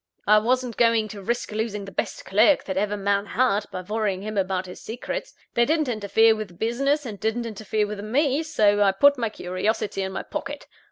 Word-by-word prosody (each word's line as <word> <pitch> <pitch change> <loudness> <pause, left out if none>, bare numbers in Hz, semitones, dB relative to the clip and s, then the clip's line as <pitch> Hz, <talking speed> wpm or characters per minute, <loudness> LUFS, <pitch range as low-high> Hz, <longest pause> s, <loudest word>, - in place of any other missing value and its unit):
I 210 +1 +6
wasn't 250 +1 0
going 230 -2 +3
to 205 -1 -8
risk 235 +4 -2
losing 210 -2 -3
the 195 - -9
best - - -4
clerk 220 +9 +4
that 190 - -4
ever 205 +2 0
man 200 0 0
had, 210 -5 +2
by 185 - -4
worrying 200 -1 -2
him 215 0 -5
about 190 -1 0
his 180 - -10
secrets. 245 - -5 0.2
They 235 - +3
didn't 310 +3 +1
interfere 220 0 +3
with 205 -6 -7
business, 275 - 0
and 210 -5 -6
didn't 220 +2 -1
interfere 215 -1 -2
with 205 0 -6
me; 270 +7 +1
so 210 -10 +2
I 195 -1 +4
put 280 +7 +5
my 230 -2 0
curiosity 195 +1 -2
in 190 0 -3
my - - -4
pocket. - - -6
215 Hz, 205 wpm, -24 LUFS, 200-235 Hz, 0.2 s, I